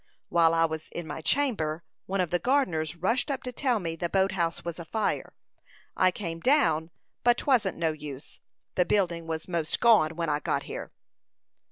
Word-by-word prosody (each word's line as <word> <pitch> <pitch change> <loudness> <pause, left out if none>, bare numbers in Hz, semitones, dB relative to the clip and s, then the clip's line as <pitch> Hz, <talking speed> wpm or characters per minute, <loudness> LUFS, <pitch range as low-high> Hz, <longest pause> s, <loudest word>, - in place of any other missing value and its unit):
While 165 -1 +4
I 165 0 +4
was 160 -1 -5
in 170 - -6
my 160 - -6
chamber, 170 - 0 0.2
one 195 0 0
of 180 - -2
the 175 - +2
gardeners 175 - +1
rushed 230 - 0
up 275 -2 -2
to 250 - -4
tell 250 -2 +1
me 165 -3 -3
the 170 +1 -3
boat 190 +1 +2
house 170 -3 -2
was 170 0 -4
afire. 210 +6 -2 0.6
I 185 - +4
came 170 -3 -5
down, 165 - +3 0.3
but 240 0 +5
'twasn't 230 -9 +2
no 165 -1 +1
use; 150 -2 -9 0.3
the 180 - +3
building 175 -3 0
was 160 0 -4
most 170 -3 -1
gone 210 -9 +5
when 170 0 -2
I 150 -1 +1
got - - -1
here." - - -7
170 Hz, 185 wpm, -28 LUFS, 160-210 Hz, 0.6 s, but